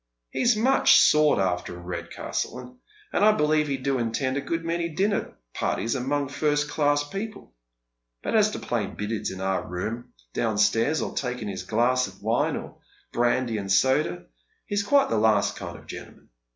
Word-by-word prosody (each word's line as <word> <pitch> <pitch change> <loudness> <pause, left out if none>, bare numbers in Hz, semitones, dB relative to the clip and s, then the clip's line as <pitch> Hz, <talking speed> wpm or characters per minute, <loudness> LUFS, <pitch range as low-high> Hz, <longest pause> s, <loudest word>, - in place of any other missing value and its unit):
He - - -2
is 245 -2 +4
much 255 +5 +5
sought 150 -1 +5
after 90 -2 -1
in 85 - -11
Redcastle, 90 - -5 0.3
and - - +2
I 215 0 +7
believe 150 -3 +2
he 140 -1 -1
do 135 0 -1
attend 125 +3 -1
a 140 - -1
good 165 +3 -3
many 170 0 -1
dinner 195 +5 -1 0.2
parties 115 - -1
among 140 +2 -1
first 145 +1 0
class 145 -1 +1
people; 200 - -7 0.7
but - - -1
as 215 -1 +5
to - - -5
playing 110 -5 -3
billiards 105 +1 -3
in 95 0 -7
our 95 0 0
room 105 +7 -5 0.2
down 110 -2 0
ptairs, 115 +8 +2
or - - -8
taking 125 -5 -3
his 95 -2 -4
glass 120 +6 +1
of - - -14
wine, - - +1
or - - -8 0.3
brandy 120 -1 +1
and 100 -1 -4
soda, 130 -6 +2 0.4
he - - -7
is 205 - +2
quite 275 +7 +3
the 110 - +1
last 105 -2 +3
kind - - -7
of - - -16
gentleman. - - -11
130 Hz, 180 wpm, -25 LUFS, 105-155 Hz, 0.7 s, I